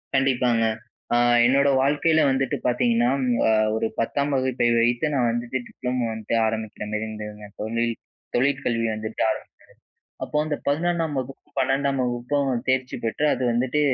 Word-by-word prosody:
கண்டிப்பாங்க. 125 -3 +2 0.5
அ - - +4 0.3
என்னோட 140 +3 +4
வாழ்க்கையில 150 +3 +3
வந்துட்டு 135 -1 0
பார்த்தீங்கன்னா 120 -1 +2 0.4
அ - - +4 0.2
ஒரு 110 0 0
10தாம் 140 +5 0
வகுப்பை 130 -2 +1
வைத்து 120 +4 +2
நான் 125 -3 +2
வந்துட்டு 120 +2 -2
டிப்ளமோ 125 -1 -3
வந்துட்டு 110 +1 -3
ஆரம்பிக்கிறமாரி 110 -1 -3
இருந்ததுங்க. 105 -1 -8
தொழில் 115 +2 -1 0.4
தொழிற்கல்வி 125 -3 +1
வந்துட்டு 110 +1 -5
ஆரம்பிச்சது. 110 - -4 0.7
அப்போ - - -5
அந்த 150 -1 -2
11னாம் 165 +1 0
வகுப்பு, 130 +1 -6
12டாம் 135 +1 +1
வகுப்பும் 125 +3 -1 0.2
தேர்ச்சி 130 0 0
பெற்று, 115 +6 -1
அது - - -5
வந்துட்டு 125 +5 0
125 Hz, 135 wpm, -24 LUFS, 115-135 Hz, 0.7 s, அ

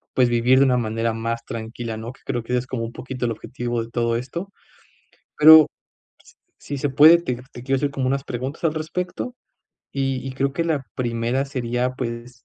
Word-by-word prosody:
pues, 125 -2 +4
vivir 120 +2 +4
de 140 - +6
una 125 - +3
manera 115 0 -1
más 115 +1 -3
tranquila, 115 0 -5
¿no? 110 +2 -6
Que - - -20
creo 120 - -2
que 120 - -8
ese 125 - +3
es 125 - -6
como 125 -3 -3
un 115 - -7
poquito 125 +1 -5
el 115 - 0
objetivo 120 +1 -4
de 115 - -11
todo 115 -1 0
esto. 170 +11 -5 0.9
Pero 155 +1 +10
s - - -6 1.0
si 145 - -4
se 145 +2 -1
puede, 150 +5 +8
te 170 -8 -3 0.2
te 120 - -10
quiero 135 +1 +1
hacer 140 +1 0
como 135 -2 -1
unas 135 +1 0
preguntas 130 +6 -5
al 160 -2 +2
respecto, 180 +9 -4 0.6
y 135 -1 -1
y 135 - -4
creo 135 0 0
que 170 - -1
la 150 -5 -1
primera 120 +2 -1
sería, 125 -1 -1
pues, 120 0 -6
125 Hz, 205 wpm, -22 LUFS, 115-140 Hz, 1.0 s, Pero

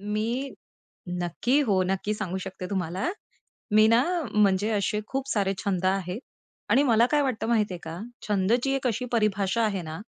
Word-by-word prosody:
मी 220 +6 -2 0.7
नक्की, 240 - +1
हो, 200 -9 +2
नक्की 195 +3 -1
सांगू 190 -3 -3
शकते 190 -1 -6
तुम्हाला. 185 - -1 0.6
मी 215 +1 +7
ना 230 +2 +5 0.3
म्हणजे 205 0 +3
असे 210 0 0
खूप 270 +2 -3
सारे 195 -3 +1
छंद 185 -2 -1
आहेत 190 +2 -1 0.5
आणि 275 - +5
मला 235 -4 +4
काय 295 -1 +3
वाटत 260 -5 -1
माहितीये 215 -5 +1
का? 160 +1 -6 0.3
छंदची 220 +7 +2
एक 270 -1 -1
अशी 250 +1 -1
परिभाषा 210 -1 +1
आहे 200 -4 -1
ना, 160 0 -6
210 Hz, 160 wpm, -26 LUFS, 190-235 Hz, 0.7 s, मी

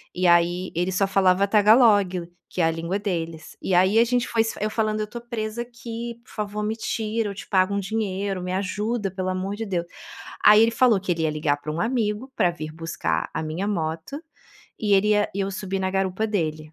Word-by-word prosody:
E 180 0 +2
aí, 175 +1 +3
ele 175 +2 0
só 195 +1 +1
falava 195 0 +3
Tagalog 205 -4 +4 0.2
que 180 - -2
é - - +4
a 165 - +3
língua 165 +4 -2
deles. 165 -5 -4
E 185 - 0
aí, 190 +5 +4
a 235 - +6
gente 245 0 +1
foi 225 - +2
se 225 - -2
f - - -6
eu 215 - +1
falando: 215 -1 -1
"Eu 210 - -2
tô 235 +3 -7
presa 235 -1 -4
aqui, 235 0 -7
por - - -19
favor 210 0 -3
me 215 +1 -1
tira, 220 -1 -2
eu 200 - -6
te - - -8
pago 190 0 +3
um - - +1
dinheiro, 195 -2 -2
me 180 0 -3
ajuda 205 +2 -2
pelo 185 -1 -4
amor 185 +2 -2
de 225 +2 -4
Deus". 180 -4 -2 0.6
Aí 210 +1 +8
ele 230 - +4
falou 235 -2 +4
que 185 -1 -2
ele 165 -1 -1
ia 155 - +2
ligar 150 -1 0
pra 145 +1 -6
um 170 - -2
amigo 230 +2 -1
pra 180 -5 +3
vir 155 -2 -7
buscar 165 0 -2
a - - -2
minha 160 +6 -3
moto, 165 - -3 0.7
e 210 -2 +1
ele 195 +2 +3
ia 210 -1 +2
eu 195 0 -1
subi 195 0 -3
na 190 - 0
garupa 195 +2 0
dele. 155 -7 -2
195 Hz, 225 wpm, -24 LUFS, 180-215 Hz, 0.7 s, Aí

